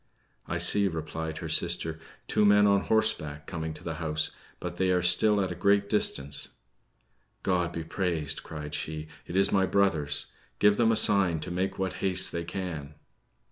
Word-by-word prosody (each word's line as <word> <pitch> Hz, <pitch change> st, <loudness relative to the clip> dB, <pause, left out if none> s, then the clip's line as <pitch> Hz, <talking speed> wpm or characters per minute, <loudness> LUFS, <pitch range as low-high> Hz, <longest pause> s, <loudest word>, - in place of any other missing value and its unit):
"I -, -, -2 dB
see," 100 Hz, -1 st, +6 dB
replied 80 Hz, -1 st, -5 dB
her 80 Hz, -, -6 dB
sister, 80 Hz, 0 st, -1 dB, 0.3 s
"two -, -, +1 dB
men 105 Hz, 0 st, +5 dB
on 100 Hz, -1 st, +3 dB
horseback 75 Hz, -10 st, +1 dB
coming 80 Hz, 0 st, -5 dB
to -, -, -10 dB
the 80 Hz, -, -4 dB
house; 75 Hz, -1 st, 0 dB, 0.3 s
but 90 Hz, 0 st, -6 dB
they 95 Hz, 0 st, +1 dB
are 90 Hz, -1 st, +1 dB
still 105 Hz, +4 st, +4 dB
at 95 Hz, -2 st, -1 dB
a -, -, -2 dB
great 100 Hz, +2 st, +2 dB
distance." 70 Hz, -9 st, 0 dB, 0.9 s
"God 90 Hz, -2 st, 0 dB
be 85 Hz, -1 st, -5 dB
praised!" 80 Hz, -4 st, -2 dB
cried 75 Hz, -1 st, -8 dB
she; 80 Hz, 0 st, -5 dB, 0.2 s
"it 85 Hz, -, -7 dB
is 95 Hz, +1 st, +3 dB
my 95 Hz, -1 st, +2 dB
brothers. 80 Hz, -8 st, +1 dB, 0.3 s
Give 105 Hz, 0 st, +4 dB
them 115 Hz, -1 st, +3 dB
a -, -, +2 dB
sign 100 Hz, -6 st, +4 dB
to 90 Hz, -, -6 dB
make 95 Hz, +2 st, -2 dB
what 95 Hz, -1 st, -2 dB
haste 95 Hz, -2 st, +2 dB
they 85 Hz, -, -3 dB
can." 85 Hz, -6 st, -6 dB
90 Hz, 180 wpm, -28 LUFS, 80-100 Hz, 0.9 s, see